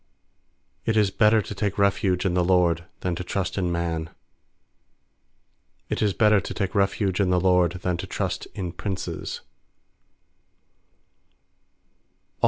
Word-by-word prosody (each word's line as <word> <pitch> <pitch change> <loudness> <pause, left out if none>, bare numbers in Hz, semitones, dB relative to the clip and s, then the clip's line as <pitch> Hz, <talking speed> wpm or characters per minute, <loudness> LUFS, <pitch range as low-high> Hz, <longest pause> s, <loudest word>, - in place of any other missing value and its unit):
8It 110 -1 +2
is 105 -3 +3
better 105 +1 +4
to - - -6
take 100 -1 -2
refuge 100 -2 +2
in 90 - +1
the 90 0 +2
LORD 85 -2 +2 0.2
Than 90 - -1
to 90 - -4
trust 95 +1 -2
in 90 -3 0
man. 85 -2 -2 1.8
9It - - -1
is 105 -2 +2
better 105 -3 +4
to - - -6
take 100 -2 -2
refuge 100 -1 +1
in 100 -2 +2
the 90 0 +3
LORD 90 -1 +3
Than 90 -1 0
to - - -6
trust - - -3
in 90 -3 -3
princes. 95 +1 -5
95 Hz, 135 wpm, -25 LUFS, 90-100 Hz, 1.8 s, better